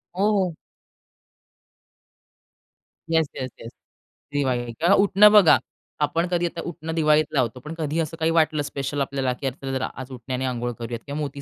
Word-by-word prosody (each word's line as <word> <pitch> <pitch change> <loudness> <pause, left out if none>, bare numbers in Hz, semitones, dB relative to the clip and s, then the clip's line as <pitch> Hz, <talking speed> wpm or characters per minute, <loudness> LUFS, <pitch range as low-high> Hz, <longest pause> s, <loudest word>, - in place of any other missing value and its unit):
हो, 200 +3 +2
हो. 180 -4 -1 2.5
Yes, 160 -2 +2
yes, 130 -1 -4
yes. 115 - -9 0.6
Diwali 125 -4 0
किंवा 175 +4 +4
उटणं 205 +1 +6
बघा. 205 -6 +7 0.4
आपण 165 +4 +1
कधी 175 0 +1
आता 170 0 -4
उटणं 165 -1 -5
दिवाळीत 155 -1 +4
लावतो, 125 -3 0
पण 150 +5 -8
कधी 155 +1 -2
असं 165 0 -3
काही 160 0 +2
वाटलं 155 -2 +2
स्पेशल 140 0 -3
आपल्याला 135 -2 -1
की 135 - 0 0.2
जरा 130 -1 -2
आज 130 - -9
उटण्याने 130 +1 -4
अंघोळ 120 -1 -2
करूयात 115 0 -5
किंवा 145 +1 -5
मोती 140 -1 -5
150 Hz, 160 wpm, -24 LUFS, 130-165 Hz, 2.5 s, बघा